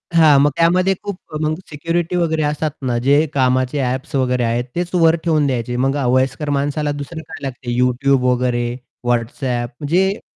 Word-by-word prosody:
हां, 155 -4 +6
मग 145 - +4
त्यामध्ये 180 +3 +3
खूप 200 -3 -4 0.2
मग 155 0 +1 0.2
सिक्युरिटी 165 +3 -2
वगैरे 160 -3 +1
असतात 150 +1 -1
ना, 120 -2 0
जे 140 +5 +3
कामाचे 130 +1 +1
ॲप्स 130 +4 -3
वगैरे 125 -2 +1
आहेत 115 +1 0
तेच 175 0 -1
वर 165 -1 +5
ठेवून 155 -4 +2
द्यायचे. 120 -2 -2
मग 135 +3 +1 0.2
वयस्कर 135 +3 0
माणसाला 145 +1 -1
दुसरं 160 +3 -7
काय 160 - -9
लागते 125 -2 -4
YouTube 125 +1 +2
वगैरे, 125 -1 0 0.4
WhatsApp 120 +1 -1
म्हणजे 185 +7 +1
140 Hz, 160 wpm, -19 LUFS, 125-160 Hz, 0.4 s, हां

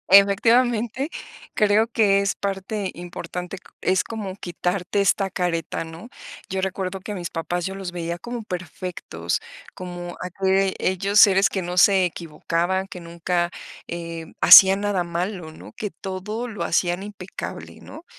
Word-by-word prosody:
Efectivamente, 230 +6 +4 0.5
creo 210 +1 +3
que 210 -4 +3
es 200 0 0
parte 195 0 -3
importante 175 +1 -6 0.2
es 185 0 +2
como 210 -5 -6
quitarte 180 +1 -2
esta 195 0 +2
careta, 175 -3 -2
¿no? 165 +8 -10 0.4
Yo 190 0 -2
recuerdo 190 0 -2
que 200 +3 -7
a - - -4
mis 175 -3 -5
papás 175 +1 -3
yo 190 0 -4
los 190 -2 -6
veía 170 0 -4
como 240 +3 -6
perfectos, 175 - -4 0.3
como 175 -1 -7
aquellos 190 +1 +1
seres 195 -3 +6
que 190 - -3
no 175 +1 -4
se 190 -1 +6
equivocaban, 170 +3 -2
que 180 - -8
nunca, 170 +1 -1 0.4
eh, 165 -1 -6
hacían 195 +1 +9
nada 200 -4 0
malo, 170 -1 -4
¿no? - - -12
Que 210 -2 -4
todo 210 +5 -5
lo 205 -7 -4
hacían 175 +3 0
impecable, 195 -2 -8
¿no? 320 - -12
190 Hz, 140 wpm, -23 LUFS, 175-200 Hz, 0.5 s, hacían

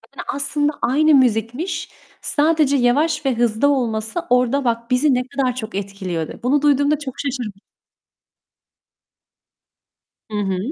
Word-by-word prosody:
Yani - - -7
aslında 290 +1 0
aynı 305 +4 +3
müzikmiş. 255 - 0 0.3
Sadece 300 -2 +2
yavaş 285 +5 +1
ve 260 -3 +1
hızlı 235 +3 +2
olması 230 0 0
orada 250 +2 +2
bak, 235 0 -2
bizi 265 +2 +3
ne 250 +1 -1
kadar 265 -3 -1
çok 220 -4 -6
etkiliyordu. 190 -5 -4
Bunu 280 +3 +2
duyduğumda 290 +1 +2
çok 265 -4 -6
şaşırmış 245 -8 -4 2.7
Hı 210 - -3
hı. 195 -2 -1
255 Hz, 125 wpm, -20 LUFS, 230-290 Hz, 2.7 s, aynı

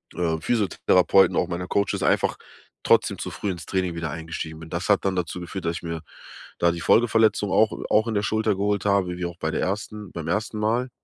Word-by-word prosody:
äh, 80 -2 0
Physiotherapeuten, 95 -3 +3
auch - - +2
meiner 90 +1 -4
Coaches, 100 0 0
einfach - - +2 0.5
trotzdem - - +3
zu - - -4
früh 100 - -3
ins 85 -2 -7
Training 95 -2 -1
wieder 85 -2 -3
eingestiegen 80 0 -6
bin. 80 - -10
Das 90 +4 -3
hat 100 -1 +3
dann 95 -1 +1
dazu 90 0 -3
geführt, 90 0 -6
dass 85 - 0
ich - - -10
mir 85 -1 -4 0.6
da 85 0 +4
die 85 -1 -5
Folgeverletzung 110 -3 +3
auch 110 0 +4 0.2
auch 110 +2 +4
in 110 - -2
der 100 - +1
Schulter 110 -1 +1
geholt 100 +1 -1
habe, 100 -3 +2
wie 90 - -4
wie 90 - -2
auch 85 0 -9
bei 80 -1 -2
der - - -1
ersten 105 +1 -4
beim 80 -2 -6
1. 105 +4 -1
Mal. 120 +4 0
95 Hz, 225 wpm, -24 LUFS, 85-105 Hz, 0.6 s, da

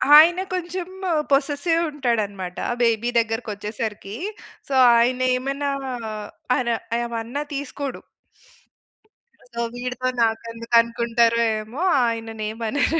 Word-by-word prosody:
ఆయన 335 +4 +8
కొంచెం 360 0 -3 0.4
possessive 290 +4 +2
ఉంటాడన్నమాట 210 -10 -2 0.2
baby 230 0 +2
దగ్గరికొచ్చేసరికి. 215 -2 -3 0.5
So 280 - -4 0.2
ఆయన 250 +2 +2 0.2
ఏమన్నా 275 +2 -2 0.9
అన్నా 235 -2 +1 0.3
ఏమన్నా 235 +3 -3
తీసుకోడు. 280 0 -4 1.5
సో 235 - -5
వీడితో 250 +1 -3 0.2
నాకెందుకు 230 +1 -3
అనుకుంటారో 235 0 +2 0.2
ఏమో 220 +8 -7 0.2
ఆయనని 225 -1 -3
ఏమనరు. 235 +8 0
235 Hz, 90 wpm, -23 LUFS, 225-280 Hz, 1.5 s, ఆయన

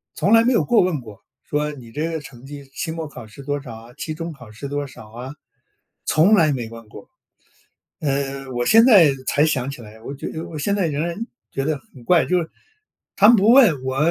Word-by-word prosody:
从 190 +7 +2
来 225 0 +7
没 250 +2 +3
有 225 - +3
过 240 -2 +4
问 180 -5 0
过， 110 -4 -13 0.3
说 150 +1 -1
你 125 -6 -12
这 155 +7 -2
个 160 - -3
成 135 -4 -13
绩， 140 0 -9
期 160 - -4
末 160 -1 -5
考 145 - -10
试 110 +6 -12
多 145 +1 -2
少 125 -5 -9
啊？ 115 +2 -13
期 155 +4 -5
中 165 +1 -6
考 125 -6 -14
试 115 +6 -7
多 145 +1 -3
少 110 -4 -13
啊， 125 +4 -8 0.7
从 165 +7 +4
来 160 -6 +4
没 120 -5 -3
问 115 -1 -12
过。 - - -13 0.9
呃， 135 -2 -2
我 120 0 -2
现 225 +1 +7
在 200 - +7 0.2
才 150 +2 +3
想 135 -4 -1
起 140 - -9
来， 110 0 -13
我 135 - -6
觉 140 - -6
得 160 - -6
我 155 - -7
现 200 +8 0
在 195 -4 +1
仍 150 +1 -2
然 170 - -4 0.3
觉 135 - -3
得 155 0 -1 0.2
很 125 -3 -14
怪， 170 +5 +3
就 180 - +2
是 165 -2 -4 0.7
他 205 - +6
们 235 - +8
不 210 +2 +4
问， 230 - +6
我 130 0 -2
145 Hz, 250 characters per minute, -21 LUFS, 130-165 Hz, 0.9 s, 们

